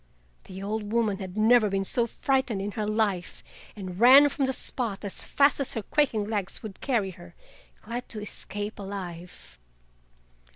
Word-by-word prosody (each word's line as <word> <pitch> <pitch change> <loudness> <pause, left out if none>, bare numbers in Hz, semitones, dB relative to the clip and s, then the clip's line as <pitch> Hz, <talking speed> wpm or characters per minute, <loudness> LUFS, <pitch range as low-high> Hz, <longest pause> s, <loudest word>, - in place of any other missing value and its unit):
The 190 +1 -8
old 210 0 -3
woman 220 -4 +1
had 190 0 -7
never 220 0 +5
been 195 0 -1
so 235 +4 +1
frightened 260 -3 0
in 200 +1 -3
her 210 0 -3
life, 210 -4 -1 0.3
and 185 -3 -7
ran 270 +5 +8
from 275 -1 -1
the - - +1
spot 230 -5 -4
as 200 - -3
fast 285 +1 +3
as 275 0 -2
her 225 - -2
quaking 265 -7 +1
legs 205 -1 -3
would 210 -4 -9
carry 225 -8 0
her, 175 -1 -14 0.5
glad 240 +3 -5
to 220 - -4
escape 205 0 -5
alive. 180 - -8
210 Hz, 165 wpm, -27 LUFS, 195-235 Hz, 0.5 s, ran